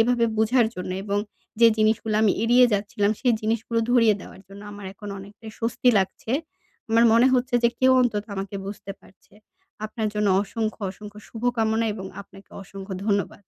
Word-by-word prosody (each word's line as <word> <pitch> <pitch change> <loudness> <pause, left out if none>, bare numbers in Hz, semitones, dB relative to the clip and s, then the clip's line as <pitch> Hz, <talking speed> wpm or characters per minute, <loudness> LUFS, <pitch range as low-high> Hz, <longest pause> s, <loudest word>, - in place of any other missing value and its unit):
এভাবে 235 +1 +3
বুঝার 225 +2 +3
জন্য 180 0 -5
এবং 205 0 -1 0.4
যে 230 - +9
জিনিসগুলা 215 0 +1
আমি 210 - +4
এড়িয়ে 245 +2 +5
যাচ্ছিলাম, 205 0 0
সেই 245 -3 +3
জিনিসগুলো 225 +1 -1
ধরিয়ে 230 -3 +5
দেওয়ার - - -12
জন্য। 200 +1 -12
আমার 205 -1 -10
এখন 205 +1 -10
অনেকটাই 205 +3 -11
স্বস্তি 235 +2 0
লাগছে। 195 +4 -3 0.6
আমার 230 +1 +5
মনে 235 +2 +5
হচ্ছে 250 0 0
যে 235 - +5
কেউ 260 0 +5
অন্তত 215 -4 0
আমাকে 195 +1 -5
বুঝতে 200 0 -7
পারছে। 195 - -23 0.5
আপনার 215 0 -3
জন্য 210 -1 +1
অসংখ্য, 220 +2 -4
অসংখ্য 210 +1 -11
শুভকামনা 225 -1 0
এবং 190 -2 -7
আপনাকে 195 0 -16
অসংখ্য 195 0 -8
ধন্যবাদ। 200 -1 -1
215 Hz, 165 wpm, -24 LUFS, 200-230 Hz, 0.6 s, যে